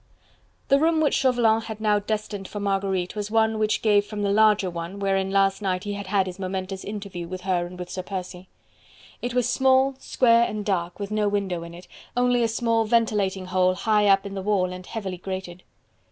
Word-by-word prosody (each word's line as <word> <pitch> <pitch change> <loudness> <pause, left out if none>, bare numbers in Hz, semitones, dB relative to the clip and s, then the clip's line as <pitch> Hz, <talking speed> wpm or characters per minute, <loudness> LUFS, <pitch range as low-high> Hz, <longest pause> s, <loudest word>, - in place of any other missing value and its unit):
The 275 0 +5
room 320 +1 +3
which 305 -3 +2
Chauvelin 240 -4 +3
had 220 -1 -7
now 210 -1 +2
destined 205 -2 -4
for 205 - -6
Marguerite 195 -2 -1
was 210 -1 -3
one 220 0 +2
which 215 0 0
gave 205 -2 +4
from 205 0 -5
the 200 - +1
larger 210 -2 +4
one, 170 +2 -5
wherein 195 -1 0
last 195 +1 +2
night 185 -2 -1
he 205 -1 -3
had 200 -1 -6
had 195 -1 +2
his 185 0 -7
momentous 190 0 -4
interview 200 -4 -6
with 185 +1 -6
her 180 -2 0
and 180 +1 -11
with 180 0 -7
Sir 185 - -3
Percy. 185 -1 -7 0.7
It 245 0 -3
was 250 -2 +2
small, 265 +1 +3
square 235 -3 +3
and 210 -1 -5
dark, 175 -3 -2
with 200 0 -5
no 215 -1 +1
window 195 -4 -1
in 170 0 -9
it: 180 +1 -13 0.3
only 245 0 +3
a 230 - +3
small 230 0 +1
ventilating 210 -4 +1
hole 185 0 +2
high 210 +1 +2
up 195 0 +4
in 200 - -6
the 195 - -4
wall 190 -2 0
and 185 0 -9
heavily 195 -5 -5
grated. 185 -1 -6
200 Hz, 210 wpm, -24 LUFS, 185-220 Hz, 0.7 s, The